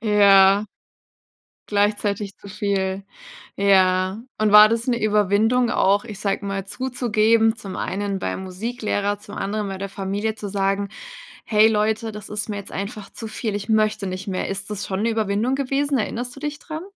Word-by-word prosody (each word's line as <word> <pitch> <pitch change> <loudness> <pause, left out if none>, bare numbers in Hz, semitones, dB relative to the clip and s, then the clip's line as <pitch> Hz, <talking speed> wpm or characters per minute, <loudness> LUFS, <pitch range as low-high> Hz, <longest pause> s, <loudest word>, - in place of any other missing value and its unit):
Ja. 200 -1 +5 1.0
Gleichzeitig 205 -1 0
zu - - -13
viel. 195 -1 -2 0.5
Ja. 190 0 +3 0.2
Und 215 -1 +2
war 210 +1 +9
das 230 +2 -1
'ne 240 -2 0
Überwindung 215 +4 +2
auch, 200 +1 +2
ich 215 -4 -8
sage 200 -1 -2
mal, 195 -1 -3
zuzugeben, 225 -2 +1
zum 195 -4 -8
einen 200 0 -3
beim 95 - -3
Musiklehrer, 205 +1 -2
zum 205 0 -11
anderen 205 +1 -2
bei 195 - -5
der 195 +1 -5
Familie 200 +3 -3
zu 210 -1 -6
sagen: 195 0 0 0.6
„Hey 215 0 +5
Leute, 220 +1 0
das 210 -1 -9
ist 210 +1 -3
mir 210 - -3
jetzt 200 - -7
einfach 200 +1 -6
zu 225 - -7
viel, 215 -1 -3
ich 205 +1 -5
möchte 215 -2 +1
nicht 185 +1 -5
mehr.“ 185 -2 -2
Ist 195 +1 -4
das 205 -1 -4
schon 195 +2 -2
'ne 230 - +2
Überwindung 220 +2 0
gewesen? 275 +1 0
Erinnerst 245 +3 -3
du - - -10
dich 295 -1 -3
dran? 315 +1 -7
210 Hz, 175 wpm, -22 LUFS, 195-220 Hz, 1.0 s, war